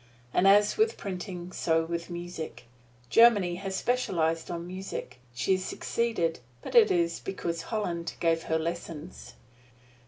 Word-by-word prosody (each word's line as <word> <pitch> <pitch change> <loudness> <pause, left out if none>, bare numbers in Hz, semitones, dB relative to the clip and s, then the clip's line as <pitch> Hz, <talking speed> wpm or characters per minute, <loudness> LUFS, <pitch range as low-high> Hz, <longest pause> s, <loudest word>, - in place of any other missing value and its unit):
And 195 - +4
as 205 +1 +5
with 440 +1 +2
printing, 180 -2 -6
so 165 -2 +1
with 170 +1 -4
music. 170 -8 -6 0.5
Germany 205 -7 +6
has 190 0 -4
specialized 165 -10 0
on 170 -1 -4
music. 185 -7 -6 0.2
She 125 - 0
has 185 -1 +2
succeeded, 205 -7 -1 0.2
but - - -7
it 470 -3 +7
is 170 -1 +1
because 170 -3 -3
Holland 175 -6 -2
gave 165 -1 +2
her 160 - +3
lessons. 165 -1 -6
175 Hz, 135 wpm, -28 LUFS, 165-195 Hz, 0.5 s, it